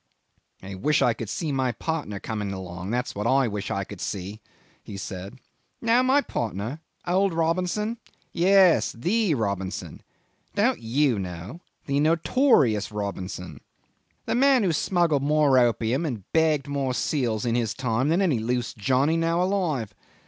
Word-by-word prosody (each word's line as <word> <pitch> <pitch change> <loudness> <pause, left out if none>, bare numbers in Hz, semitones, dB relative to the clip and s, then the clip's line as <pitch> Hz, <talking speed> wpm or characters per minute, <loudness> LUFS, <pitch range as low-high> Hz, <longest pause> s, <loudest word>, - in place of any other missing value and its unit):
"I 95 +1 -7
wish 145 +11 +1
I 120 - +3
could 110 -2 -6
see 155 +6 -2
my 130 -3 0
partner 145 -8 -3
coming 105 -2 -4
along, 90 -1 -6
that's 125 +2 -2
what 105 +3 -2
I 135 +1 +3
wish 105 -2 -4
to 100 0 -2
see," 100 +4 -5 0.4
he 100 - -9
said. 95 +1 -7 0.4
"Know 235 +2 +3
my 265 +3 +4
partner? 115 - -4 0.3
Old 185 0 +1
Robinson. 180 +7 0 0.3
Yes; 185 0 +4
the 180 - +1
Robinson. 100 - -3 0.5
Don't - - +2
you 120 0 +1
know? 90 - -7 0.2
The 140 0 0
notorious 155 - +3
Robinson. 95 -4 -5 0.6
The - - -1
man 260 0 +4
who 180 -4 +1
smuggled 165 -3 +1
more 145 -2 +4
opium 120 +3 +1
and 115 -9 -4
bagged 155 -4 +2
more 140 -3 -1
seals 120 -8 -1
in 115 - +1
his 115 -3 0
time 130 +1 0
than 175 +5 +2
any 150 -11 +2
loose 120 +2 -2
Johnny 135 +9 +1
now 165 +1 +1
alive. 165 - -1
130 Hz, 150 wpm, -25 LUFS, 105-165 Hz, 0.6 s, my